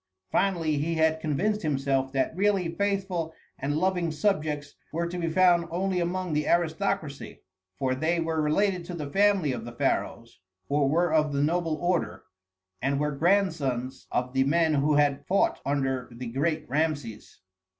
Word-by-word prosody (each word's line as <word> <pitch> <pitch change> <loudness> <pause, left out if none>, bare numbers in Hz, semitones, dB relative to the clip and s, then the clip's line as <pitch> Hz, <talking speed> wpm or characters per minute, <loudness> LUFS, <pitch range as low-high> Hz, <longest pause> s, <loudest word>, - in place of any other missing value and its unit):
Finally, 165 -6 +1
he 165 +3 -1
had 160 0 +2
convinced 190 +8 0
himself 135 -3 0
that 135 +3 0
really 195 -2 +2
faithful 190 -4 -1 0.2
and 145 +2 -1
loving 180 -1 +1
subjects 150 -5 -1 0.2
were 170 +2 -1
to 175 +1 -4
be 165 -1 -1
found 175 0 +4
only 185 +2 -1
among 180 0 -2
the 150 0 0
aristocracy, 170 -3 -1 0.3
for 130 -1 0
they 160 +6 0
were 160 -1 0
related 180 +4 +1
to 175 +1 -7
the 150 -4 -5
family 195 -6 +3
of 120 -3 -4
the 120 - -7
pharaohs, 120 -2 -2 0.3
or 140 -1 +2
were 170 +2 +2
of 155 -1 +3
the 140 0 +1
noble 165 0 0
order, 175 - -1 0.6
and 140 +2 0
were 150 0 0
grandsons 145 -7 0
of 125 +1 -1
the 135 0 +3
men 160 +3 +2
who 145 +1 +2
had 145 -1 +2
fought 195 - +2
under 135 -3 -1
the 120 +2 -7
great 150 +6 -1
Rameses. 145 -6 -2
155 Hz, 160 wpm, -27 LUFS, 140-175 Hz, 0.6 s, found